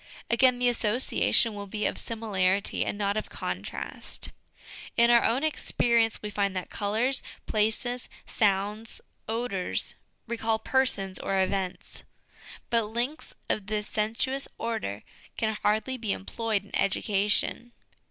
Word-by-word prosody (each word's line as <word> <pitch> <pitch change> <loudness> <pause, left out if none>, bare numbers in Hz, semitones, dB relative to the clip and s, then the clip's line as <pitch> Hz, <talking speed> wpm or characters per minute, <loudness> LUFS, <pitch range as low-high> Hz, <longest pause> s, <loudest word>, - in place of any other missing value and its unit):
Again, 250 +1 +5
the 245 0 +2
association 235 0 +3
will 205 -1 -6
be 210 +2 -2
of - - +1
similarity, 200 -4 +1
and - - -3
not 200 0 0
of 215 - -3
contrast. - - -5 0.7
In 235 +1 +6
our 235 -1 +6
own 245 +6 +2
ex 310 -1 -1
perience 230 -2 +3
we 210 - -3
find 200 -2 0
that 185 - -4
colours, 225 +6 +1 0.2
places, 225 +3 0 0.2
sounds, 210 +1 0 0.3
odours 225 -5 -1 0.3
recall 225 -1 0
persons 220 -6 +1
or 195 0 0
events; 190 -1 -1 0.7
but 230 -2 +3
links 240 +8 -3
of 200 -2 -1
this 210 -1 -1
sensuous 230 +6 0
order 220 - -3 0.3
can 220 -1 0
hardly 220 +5 +1
be 225 -4 -1
employed 215 +1 -2
in - - -7
education. 210 +4 +1
220 Hz, 130 wpm, -28 LUFS, 200-235 Hz, 0.7 s, In